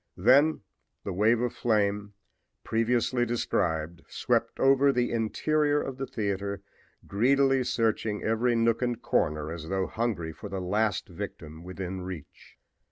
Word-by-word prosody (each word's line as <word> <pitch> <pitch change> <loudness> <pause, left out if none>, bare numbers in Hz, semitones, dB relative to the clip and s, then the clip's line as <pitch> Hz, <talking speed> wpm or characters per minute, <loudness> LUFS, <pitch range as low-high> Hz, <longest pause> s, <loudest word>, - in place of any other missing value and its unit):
Then 135 - +4 0.4
the 100 - -4
wave 110 +5 +3
of 125 -1 -1
flame, 105 -2 0 0.5
previously 120 +2 +1
described, 85 -8 -1
swept - - -1
over 135 +1 +5
the 125 -2 0
interior 145 +6 +1
of 135 -3 -4
the 135 - -3
theater, 100 -4 -3 0.4
greedily 135 +5 +3
searching 110 -3 0
every 115 +2 +1
nook 115 0 +2
and 120 -2 -1
corner 75 -7 0
as 80 -1 -7
though 95 -1 0
hungry 105 -9 -2
for 105 - -9
the 100 -1 -3
last 105 +3 0
victim 80 +1 -8
within 95 0 -5
reach. 90 -5 -10
110 Hz, 135 wpm, -28 LUFS, 95-125 Hz, 0.5 s, over